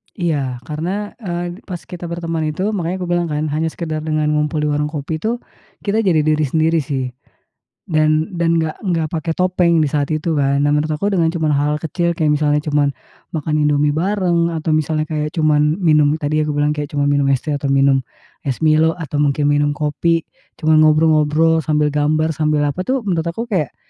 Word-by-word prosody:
Iya, 140 -9 -2
karena, 180 +10 -4
eee, 175 -4 -4
pas 175 -4 -6
kita 175 -1 -7
berteman 165 -2 -3
itu, 185 +7 -1
makanya 185 -2 -2
kubilang, 175 -1 0
kan, 150 -1 -2
hanya 155 +2 -1
sekedar 160 -3 -4
dengan 155 -1 0
ngumpul 150 0 0
di 150 - 0
warung 150 0 0
kopi, 150 +1 -4
tuh, 230 +8 -2 0.4
kita 220 +2 0
jadi 165 -5 +3
diri 155 0 +1
sendiri, 160 +4 +1
sih, 135 -4 -2 0.7
dan 155 +2 +1
dan 170 0 +2
gak 160 -1 -1 0.2
gak 160 -1 0
pakai 165 0 -2
topeng 180 -3 +2
di 145 - -1
saat 145 -1 0
itu, 155 0 -1
kan. 140 0 +2
Nah, 145 - +2
menurut 150 +1 +1
aku 200 +6 -1
dengan 170 -4 +2
cuman 155 -2 +1
hal 145 +1 +1
kecil 170 +2 -1
kayak 155 -2 +1
misalnya 150 0 +1
cuman 145 -2 +1 0.4
makan 155 0 -1
Indomie 145 0 +2
bareng, 175 0 +1
atau 160 0 -2
misalnya 155 0 +1
kayak 150 0 -3
cuman 150 -1 +2
minum, 150 -2 +4
tadi 155 0 -1
aku 150 -1 -1
bilang 145 +1 +2
kayak 150 -1 -4
cuman 145 0 +2
minum 140 -1 +2
es 135 -2 +1
teh, 155 - -3
atau 145 -1 -2
minum 135 0 +3 0.5
es 135 +4 -2
Milo, 155 +1 +3
atau 150 -4 -4
mungkin 145 0 +2
minum 145 0 +1
kopi, 155 +3 0 0.4
cuman, 155 0 +5
ngobrol-ngobrol 155 +1 +4
sambil 150 0 +1
gambar 155 +2 +1
sambil 150 -1 0
apa, 145 - -2
tuh, 260 -2 0
menurut 175 -5 -1
aku 225 +8 -4
kayak 165 -8 -1
155 Hz, 195 wpm, -18 LUFS, 150-170 Hz, 0.7 s, cuman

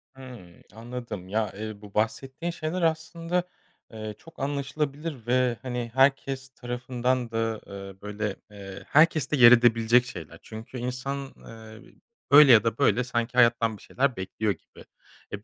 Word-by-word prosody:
Hımm, 120 -10 -12
anladım. 115 -5 -7
Ya, 105 0 -1
eee, 110 0 -7
bu 105 -1 -13
bahsettiğin 135 +9 -2
şeyler 170 +2 -4
aslında, 165 +2 -1 0.5
eee, 110 -1 -6
çok 165 0 -17
anlaşılabilir 140 -1 -3
ve, 125 -1 +2
hani, 125 -2 -4
herkes 135 0 +2
tarafından 125 -1 -2
da, 115 -1 -2
ııı, 95 -1 -10
böyle, 105 0 -4 0.2
eee, 100 -1 -10
herkeste 155 -2 +3
yer 120 -1 +9
edebilecek 120 0 +5
şeyler. 85 -8 -9
Çünkü 110 +3 -9
insan, 130 +3 -4
ııı, 110 -1 -13 0.5
öyle 145 -2 +9
ya 115 -1 +7
da 115 -1 -1
böyle 120 +5 +3
sanki 120 -1 -2
hayattan 115 -2 +4
bir - - -19
şeyler 135 -1 -1
bekliyor 100 +3 -2
gibi. 85 - -11 0.5
E, 105 0 -6
120 Hz, 145 wpm, -26 LUFS, 110-135 Hz, 0.5 s, yer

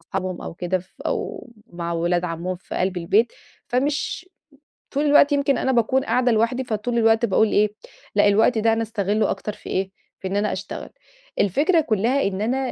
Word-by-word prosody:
اصحابهم 185 +1 -4
أو - - -7
كده 180 +2 -1
ف 185 +1 -16
أو - - -3 0.2
مع 170 0 -4
ولاد 175 +1 0
عمّهم 175 +2 -3
في 180 - -10
قلب 185 0 0
البيت. 200 +7 +2 0.4
فمش 285 +7 -1 0.6
طول 285 +2 0
الوقت 290 0 +5
يمكن 280 -1 +2
أنا 265 - +1
باكون 260 +3 +2
قاعدة 250 -1 +2
لوحدي. 230 +4 +1
فطول 235 +1 -2
الوقت 225 +1 +4
باقول 215 +1 +3
إيه 210 0 +2 0.4
لأ 205 0 +5
الوقت 220 +3 +3
ده 225 +1 +3
أنا 225 0 0
أستغلّه 215 -1 0
أكتر 210 - -3
في - - -11
إيه؟ 190 0 -1 0.3
في 190 - -4
إن 195 - -2
أنا 210 +1 +1
أشتغل. - - -6 0.5
الفكرة 305 - +3
كُلّها 245 0 +1
إن 195 0 -1
أنا 240 +5 0
215 Hz, 185 wpm, -22 LUFS, 190-250 Hz, 0.6 s, الوقت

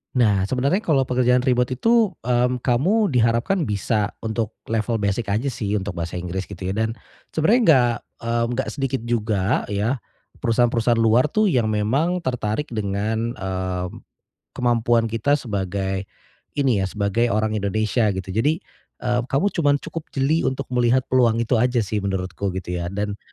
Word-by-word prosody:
Nah, 105 -6 +3
sebenarnya 135 - 0
kalau 135 - +2
pekerjaan 125 0 +3
remote 125 -1 +1
itu, 230 -3 +4 0.2
mmm, 125 0 +2
kamu 170 - +2
diharapkan 115 - +2
bisa 105 -2 0
untuk 110 -1 -3
level 115 +1 0
basic 100 +1 -1
aja 110 +7 0
sih 110 -6 -3
untuk 95 -1 -5
bahasa 85 +1 -4
Inggris 90 +2 -3
gitu 95 -2 -10
ya. 95 - -2
Dan 110 +1 0 0.4
sebenarnya 205 +11 +3
enggak, 125 - +5 0.3
mmm, 115 0 0
gak - - -1
sedikit 135 -2 -1
juga 110 -2 0
ya 110 +5 -1 0.4
perusahaan-perusahaan 115 0 +2
luar 115 +6 +3
tuh 215 0 +3
yang 120 - +2
memang 135 +13 +1
tertarik 125 -3 -2
dengan, 110 +3 -1
mmm, 95 -1 -4 0.5
kemampuan 120 -1 +2
kita 115 +6 +2
sebagai 95 -5 -3 0.5
ini 135 -7 +2
ya 95 - 0
sebagai 105 +4 0
orang 110 -1 0
Indonesia 110 +3 +1
gitu. 95 0 -5
Jadi, 145 - +1 0.4
eee, 120 0 +2
kamu 145 +11 +1
cuman 145 -4 +2
cukup 165 -2 -6
jeli 145 +4 +2
untuk 130 +1 -1
melihat 125 +1 +3
peluang 120 -3 +4
itu 115 +1 +1
aja 125 -1 +2
sih 105 +2 -2
menurutku 95 0 -3
gitu 90 -1 -4
ya, 85 - -3
dan 100 +2 -3
115 Hz, 155 wpm, -22 LUFS, 100-130 Hz, 0.5 s, enggak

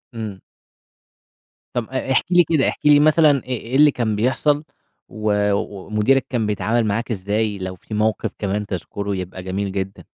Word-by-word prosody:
إمم 105 -4 -5 1.3
طَب 120 -2 -2
آآ 130 0 -3
احكِ - - +2
لي 175 0 +6
كده، 155 -3 +1
احكِ - - -8
لي 145 -1 +7
مثلًا 155 -2 +5
إ - - -14
إيه 125 0 -4
اللي 150 +1 +6
كان 110 -5 -1
بيحصل 145 +6 +1 0.5
و 110 -1 -2 0.2
ومديرك 105 +6 0
كان 120 -4 0
بيتعامل 105 +3 0
معاك 115 +4 -1
إزاي 105 +1 -1
لو 95 0 -5
في 105 - -11
موقف 110 +1 0
كمان 105 +1 -2
تذكُره 100 +1 -4
يبقى 95 0 -6
جميل 95 +1 -3
جدا؟ 95 0 -4
110 Hz, 165 wpm, -21 LUFS, 100-130 Hz, 1.3 s, لي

